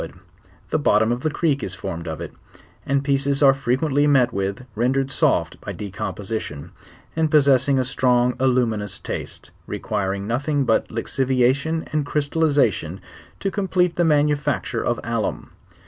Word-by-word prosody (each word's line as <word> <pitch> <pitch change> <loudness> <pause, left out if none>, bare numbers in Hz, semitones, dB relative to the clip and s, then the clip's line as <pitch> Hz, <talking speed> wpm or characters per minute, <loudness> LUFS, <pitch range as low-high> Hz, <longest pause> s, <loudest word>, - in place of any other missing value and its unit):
JfuouVthe 155 - +1
bottom 110 -3 +3
>f 120 - -1
the 155 - -1
creek 150 -2 0
is 95 -3 -4
formed 85 -1 -6
of 80 -1 -4
it; - - -7 0.5
and 140 0 +1
pieces 140 0 +1
are 135 -1 +7
frequently 135 +3 +1
met 135 -4 +4
w 100 -2 -1
iLii 110 +6 -13
rendered 130 +4 0
soft - - +1
by - - -6
decomposition, 100 -5 -5 0.4
and 160 -1 +1
possessing 140 -2 +4
a 130 - +2
strong 125 -1 +2
aiumiuo'js 115 -6 0
tu&te, - - -6 0.2
requiring 100 -1 -2
nothing 140 +6 0
but 110 - +2
lixiviation 130 +6 0
and 150 -2 0
cr/sUliizUion 145 - +1 0.4
to 195 - -2
complete 185 -3 +1
the 175 - +2
manufacture 150 -2 +1
of - - 0
iflluiii. - - -2
130 Hz, 145 wpm, -22 LUFS, 110-145 Hz, 0.5 s, are